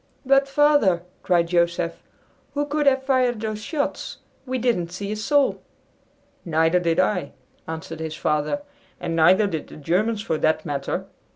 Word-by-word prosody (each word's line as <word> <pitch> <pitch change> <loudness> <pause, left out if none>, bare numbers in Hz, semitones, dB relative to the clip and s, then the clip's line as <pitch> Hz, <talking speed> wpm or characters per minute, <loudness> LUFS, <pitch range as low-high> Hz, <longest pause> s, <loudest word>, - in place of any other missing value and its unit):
"But, 275 +1 +4
Father," 275 - +3 0.2
cried 175 -2 +2
Joseph, 170 -1 0 0.5
"who 290 0 0
could 295 0 0
have 265 -1 +4
fired 255 -3 +2
those 215 -1 -4
shots? 285 +5 -3 0.3
We 260 0 -1
didn't 225 -9 0
see 200 +3 -5
a - - -1
soul." 275 +6 +1 0.8
"Neither 165 +1 +2
did 170 -2 0
I," 185 -1 0 0.3
answered 160 0 -6
his 160 -1 -4
father; 150 - -1 0.4
"and 165 -2 -3
neither 180 +6 +5
did 160 -6 -3
the - - -12
Germans 205 +8 0
for 160 -8 -1
that 155 0 +1
matter. 140 -1 -3
185 Hz, 155 wpm, -23 LUFS, 165-260 Hz, 0.8 s, neither